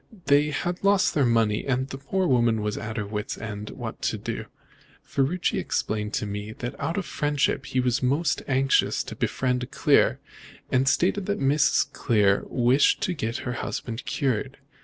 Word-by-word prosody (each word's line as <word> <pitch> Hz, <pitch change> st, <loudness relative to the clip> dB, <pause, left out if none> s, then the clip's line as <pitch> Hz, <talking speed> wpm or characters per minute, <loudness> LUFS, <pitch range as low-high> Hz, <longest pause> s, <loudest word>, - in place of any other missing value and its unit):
They 145 Hz, +1 st, +4 dB
had 175 Hz, +5 st, -3 dB
lost 200 Hz, -1 st, +3 dB
their 140 Hz, -4 st, +3 dB
money, 115 Hz, -3 st, +2 dB
and 130 Hz, -1 st, 0 dB
the 135 Hz, 0 st, -7 dB
poor 185 Hz, +7 st, -1 dB
woman 120 Hz, -6 st, +2 dB
was 105 Hz, 0 st, -1 dB
at 110 Hz, +2 st, -5 dB
her 105 Hz, -, -2 dB
wit's 105 Hz, 0 st, -4 dB
end 105 Hz, -1 st, -6 dB
what -, -, -7 dB
to -, -, -1 dB
do. -, -, -5 dB, 0.6 s
Ferruci 160 Hz, +6 st, 0 dB
explained 105 Hz, 0 st, -2 dB
to -, -, -1 dB
me 105 Hz, +1 st, -5 dB
that 120 Hz, +2 st, -5 dB
out 165 Hz, -, -2 dB
of 195 Hz, -, -1 dB
friendship 145 Hz, -3 st, 0 dB
he 130 Hz, -, -1 dB
was 125 Hz, 0 st, +1 dB
most 140 Hz, +6 st, +1 dB
anxious 135 Hz, 0 st, +2 dB
to -, -, -8 dB
befriend 125 Hz, -1 st, -1 dB
Clear, -, -, +3 dB, 0.5 s
and 130 Hz, +1 st, +2 dB
stated 185 Hz, +4 st, +1 dB
that 205 Hz, -, -1 dB
Mrs. 140 Hz, +2 st, +2 dB
Clear 105 Hz, -5 st, +2 dB
wished 125 Hz, +3 st, +3 dB
to 185 Hz, -, 0 dB
get 115 Hz, -7 st, -3 dB
her 125 Hz, -, -2 dB
husband 120 Hz, -1 st, -4 dB
cured. 135 Hz, -1 st, -1 dB
130 Hz, 175 wpm, -25 LUFS, 110-145 Hz, 0.6 s, They